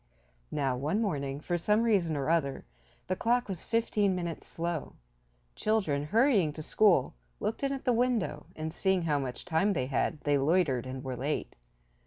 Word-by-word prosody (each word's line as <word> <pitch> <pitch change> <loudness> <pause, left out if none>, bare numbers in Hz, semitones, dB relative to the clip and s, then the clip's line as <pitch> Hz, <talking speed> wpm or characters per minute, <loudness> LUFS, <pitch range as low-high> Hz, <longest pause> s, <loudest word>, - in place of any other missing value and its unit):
Now 135 -4 0
one 150 +11 -1
morning, 140 -10 -1
for 175 +3 -2
some 210 +6 +2
reason 185 -9 +2
or 140 - -2
other, 155 -5 0 0.4
the 185 - -1
clock 240 +5 +1
was 190 -4 -5
fifteen 210 -4 +1
minutes 170 -2 -4
slow. 170 -2 -3 0.6
Children, 175 -10 0
hurrying 210 - +3
to 155 - -7
school, 185 -7 +3 0.3
looked 220 - -2
in 275 -1 0
at 270 -1 -4
the 250 - +3
window, 230 -11 0
and, 160 0 -4
seeing 190 -2 +1
how 150 -3 +1
much 130 -2 -5
time 180 +5 +2
they 130 -7 -1
had 145 +4 -1
they 145 -1 +2
loitered 140 -4 +2
and 130 +1 -6
were 130 -2 -4
late. 140 +5 -3
165 Hz, 175 wpm, -30 LUFS, 145-210 Hz, 0.6 s, hurrying